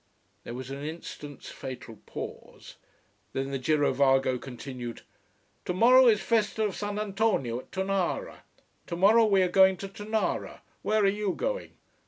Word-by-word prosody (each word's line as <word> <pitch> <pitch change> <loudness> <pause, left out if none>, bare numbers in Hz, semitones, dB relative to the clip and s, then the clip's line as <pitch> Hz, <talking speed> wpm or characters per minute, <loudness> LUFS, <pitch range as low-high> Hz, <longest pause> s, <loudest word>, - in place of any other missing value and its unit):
There 120 - -6
was 130 +1 -7
an 140 +1 -6
instant's 150 -2 -8
fatal 125 -5 -8
pause, - - -9 0.6
then 135 +1 -2
the 135 - -2
girovago 135 -2 +2
continued: 125 -2 -7 0.6
"Tomorrow 245 +8 +6
is 215 -3 +4
festa 220 -1 +1
of 210 -3 -1
Sant 205 0 -3
'Antonio 200 - 0
at - - -14
Tonara. 195 - -1 0.5
Tomorrow 200 +6 +5
we 195 -3 +4
are - - +2
going 190 +1 +5
to 195 - -6
Tonara. 215 +2 -3 0.2
Where 215 0 +2
are - - +5
you 205 0 0
going?" - - -3
190 Hz, 140 wpm, -28 LUFS, 135-210 Hz, 0.6 s, Tomorrow